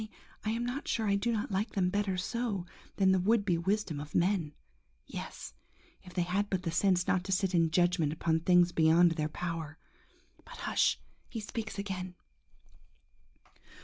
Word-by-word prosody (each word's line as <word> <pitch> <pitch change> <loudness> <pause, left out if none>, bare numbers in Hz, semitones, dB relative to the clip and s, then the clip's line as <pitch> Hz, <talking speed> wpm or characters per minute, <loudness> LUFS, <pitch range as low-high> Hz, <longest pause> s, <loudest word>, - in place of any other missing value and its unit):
Only 215 - -6 0.4
I - - +1
am 230 +2 -1
not 250 +4 -4
sure 220 -2 0
I 200 - +3
do 230 +4 0
not 215 -2 -2
like 195 +4 -1
them 180 -2 +1
better 200 -2 0
so, 205 -1 -2 0.3
than 195 -1 +3
in - - +6
the 190 - +3
would 205 +3 +2
be 180 -4 +2
wisdom 190 -4 -1
of 145 +1 -8
men. 175 -4 +1 0.5
Yes! - - -7 0.5
if 180 - -13
they 180 - +2
had 195 +4 -1
but 185 -2 -1
the 165 - -2
sense 180 +1 +2
not 180 - +1
to 195 - -4
sit 190 0 +1
in 165 -2 +3
judgment 175 -2 +2
upon 160 +1 0
things 175 +1 +4
beyond 165 +2 +5
their 155 -2 -1
power!... 165 -2 -5 0.7
But - - -12
hush! - - +1 0.3
he 230 - -5
speaks 220 0 -5
again. 185 -2 -4
185 Hz, 180 wpm, -31 LUFS, 170-205 Hz, 0.7 s, in